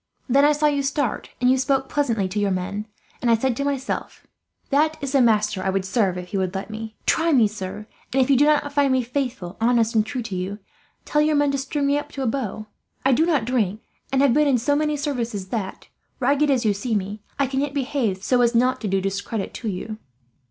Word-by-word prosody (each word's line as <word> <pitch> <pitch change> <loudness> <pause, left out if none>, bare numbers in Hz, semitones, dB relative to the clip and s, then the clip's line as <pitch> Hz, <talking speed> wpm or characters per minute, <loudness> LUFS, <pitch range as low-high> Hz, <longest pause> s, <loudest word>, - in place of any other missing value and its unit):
Then 275 +2 +4
I 295 - +6
saw 300 +1 +1
you 290 -1 +2
start, 280 -3 -1
and 250 - +2
you 260 - +3
spoke 270 0 +1
pleasantly 230 -9 0
to 205 +3 -2
your 205 -1 +1
men; 200 +3 -3 0.3
and 240 - +1
I 230 - +6
said 255 +1 0
to 280 - -1
myself, 280 -2 -3 0.5
'that 310 +3 +2
is 275 -2 -4
the 275 -2 +4
master 215 -4 +2
I 190 - -1
would 190 0 -1
serve, 190 -3 +1
if 180 0 -7
he 200 - -2
would 185 0 -2
let 195 +2 -4
me.' 220 0 -7
"Try 330 +1 +2
me, 245 -7 +5
sir, 205 0 -6 0.3
and 270 - +1
if 255 - +4
you 275 - +4
do 285 +3 +5
not 295 -1 +2
find 285 -2 +3
me 260 -1 +2
faithful, 245 -8 -3
honest, 230 -1 +3
and 220 -2 +3
true 250 +2 -4
to 215 -4 -5
you, 185 +3 -3 0.5
tell 300 - +2
your 305 0 +2
men 290 -1 +3
to 275 - -1
string 280 +2 -2
me 285 +1 +2
up - - -9
to 275 - -3
a - - -1
bough. 225 -4 -2 0.4
I 270 - +5
do 315 +7 +3
not 295 -9 +2
drink, 220 -4 0 0.3
and 270 0 +3
have 275 -4 +4
been 300 +2 +3
in 270 -3 +4
so 285 +5 +1
many 300 0 0
services 235 -9 -3
that, 200 -4 -4 0.3
ragged 285 +3 +2
as 255 -4 +2
you 210 - +3
see 220 +3 -2
me, 205 +1 -3 0.2
I 280 - +2
can 265 +1 -2
yet 285 0 -3
behave 250 -8 -1
so 250 +2 +3
as 235 0 +3
not 255 +2 +2
to 215 - -2
do 195 0 +1
discredit 195 +2 -3
to 230 - -6
you." 215 +3 -5
245 Hz, 245 wpm, -23 LUFS, 210-280 Hz, 0.5 s, I